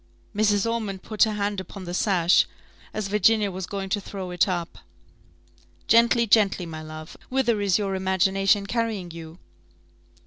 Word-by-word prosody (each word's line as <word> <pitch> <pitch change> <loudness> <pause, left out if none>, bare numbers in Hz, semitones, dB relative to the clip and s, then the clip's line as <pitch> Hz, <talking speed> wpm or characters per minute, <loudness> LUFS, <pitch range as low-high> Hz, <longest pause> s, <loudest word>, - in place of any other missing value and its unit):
Mrs. 210 0 +2
Ormond 215 -5 -3
put 215 +1 +2
her 215 - -2
hand 205 -1 -2
upon 190 +1 -9
the 175 -1 -6
sash, 180 -2 +3 0.4
as 215 -2 -3
Virginia 210 +1 +2
was 185 0 -6
going 195 -1 -4
to 205 +1 -1
throw 190 -2 -7
it 180 +1 +2
up 175 -3 -4 1.1
"Gently, 235 +1 +4
gently, 200 -4 +3
my 160 -1 -7
love 155 +1 -9
whither 240 -5 +1
is 200 -3 +2
your 200 -2 -2
imagination 190 +1 +1
carrying 220 -5 -2
you?" 165 0 -10
195 Hz, 150 wpm, -24 LUFS, 185-215 Hz, 1.1 s, Gently